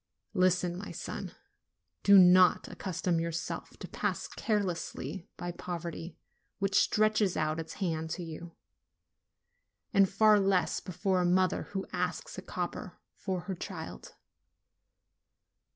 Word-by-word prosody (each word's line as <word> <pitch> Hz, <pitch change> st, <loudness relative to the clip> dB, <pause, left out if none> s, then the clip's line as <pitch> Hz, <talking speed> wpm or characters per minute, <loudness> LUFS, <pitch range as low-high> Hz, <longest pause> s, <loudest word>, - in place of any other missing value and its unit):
Listen, 180 Hz, -2 st, +2 dB
my 200 Hz, +3 st, -7 dB
son. -, -, -6 dB, 0.7 s
Do 200 Hz, 0 st, +7 dB
not 180 Hz, 0 st, +6 dB
accustom 180 Hz, -2 st, -2 dB
yourself 165 Hz, 0 st, -4 dB
to -, -, -8 dB
pass -, -, -2 dB
carelessly 195 Hz, -4 st, -2 dB
by 175 Hz, -, -4 dB
poverty 170 Hz, -1 st, -6 dB, 0.4 s
which 195 Hz, -1 st, -1 dB
stretches 215 Hz, -3 st, +2 dB
out 155 Hz, +1 st, 0 dB
its 160 Hz, 0 st, -6 dB
hand 160 Hz, -5 st, -2 dB
to 180 Hz, -, -5 dB
you, 165 Hz, +1 st, -8 dB, 1.4 s
and 195 Hz, -2 st, +5 dB
far 210 Hz, +1 st, +5 dB
less 190 Hz, -4 st, +2 dB
before 185 Hz, +1 st, -1 dB
a -, -, +1 dB
mother 185 Hz, +1 st, +2 dB
who 190 Hz, -, -2 dB
asks 180 Hz, 0 st, -2 dB
a 185 Hz, -, -6 dB
copper 180 Hz, 0 st, -5 dB, 0.2 s
for 185 Hz, -3 st, -3 dB
her 190 Hz, -, -4 dB
child. 165 Hz, -, -7 dB
180 Hz, 120 wpm, -31 LUFS, 170-195 Hz, 1.4 s, Do